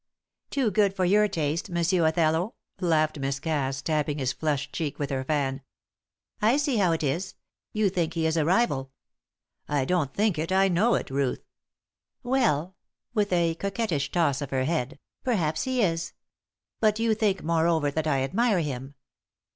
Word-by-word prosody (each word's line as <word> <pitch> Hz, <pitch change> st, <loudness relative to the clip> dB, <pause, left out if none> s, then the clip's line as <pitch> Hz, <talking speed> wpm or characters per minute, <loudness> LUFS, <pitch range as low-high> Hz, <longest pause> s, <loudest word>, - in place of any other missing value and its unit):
"Too 260 Hz, -7 st, +1 dB
good 200 Hz, -1 st, +2 dB
for 185 Hz, -1 st, +1 dB
your 210 Hz, +3 st, +4 dB
taste, 160 Hz, -3 st, -2 dB
Monsieur 170 Hz, -1 st, +2 dB
Othello," 160 Hz, +5 st, +1 dB, 0.2 s
laughed 155 Hz, -4 st, +1 dB
Miss 135 Hz, 0 st, -2 dB
Cass, 135 Hz, -4 st, -2 dB
tapping 150 Hz, -1 st, 0 dB
his 130 Hz, -2 st, -1 dB
flushed 150 Hz, -2 st, -2 dB
cheek 155 Hz, -4 st, -3 dB
with 145 Hz, -2 st, -3 dB
her 130 Hz, -1 st, -1 dB
fan. 135 Hz, -2 st, -1 dB, 0.8 s
"I 225 Hz, +6 st, +4 dB
see 290 Hz, -4 st, +1 dB
how 185 Hz, -4 st, +3 dB
it 165 Hz, -1 st, -1 dB
is. 165 Hz, +7 st, -2 dB, 0.4 s
You 215 Hz, -1 st, +1 dB
think 175 Hz, -3 st, -1 dB
he 165 Hz, -1 st, 0 dB
is 160 Hz, 0 st, +1 dB
a 160 Hz, -, +2 dB
rival." 160 Hz, -, +1 dB, 0.8 s
"I 145 Hz, -3 st, +1 dB
don't 160 Hz, -4 st, 0 dB
think 205 Hz, -4 st, +1 dB
it, 165 Hz, +3 st, -2 dB
I 190 Hz, +1 st, +4 dB
know 205 Hz, +7 st, +3 dB
it. -, -, -3 dB
Ruth." 135 Hz, -1 st, -1 dB, 0.8 s
"Well," 190 Hz, -, +1 dB, 0.4 s
with 210 Hz, -3 st, +1 dB
a 170 Hz, -2 st, +2 dB
coquettish 190 Hz, -5 st, -2 dB
toss 155 Hz, -5 st, +1 dB
of 140 Hz, -, -4 dB
her 130 Hz, -1 st, 0 dB
head, 155 Hz, 0 st, -1 dB, 0.3 s
"perhaps 165 Hz, -11 st, 0 dB
he 255 Hz, -2 st, +1 dB
is. 165 Hz, -2 st, -1 dB, 0.7 s
But 215 Hz, -1 st, +3 dB
you 225 Hz, 0 st, +2 dB
think, 210 Hz, -3 st, 0 dB
moreover, 160 Hz, -2 st, +2 dB
that 155 Hz, +2 st, -2 dB
I 135 Hz, -3 st, +1 dB
admire 200 Hz, -, +2 dB
him. 135 Hz, -2 st, -5 dB
165 Hz, 170 wpm, -26 LUFS, 145-195 Hz, 0.8 s, your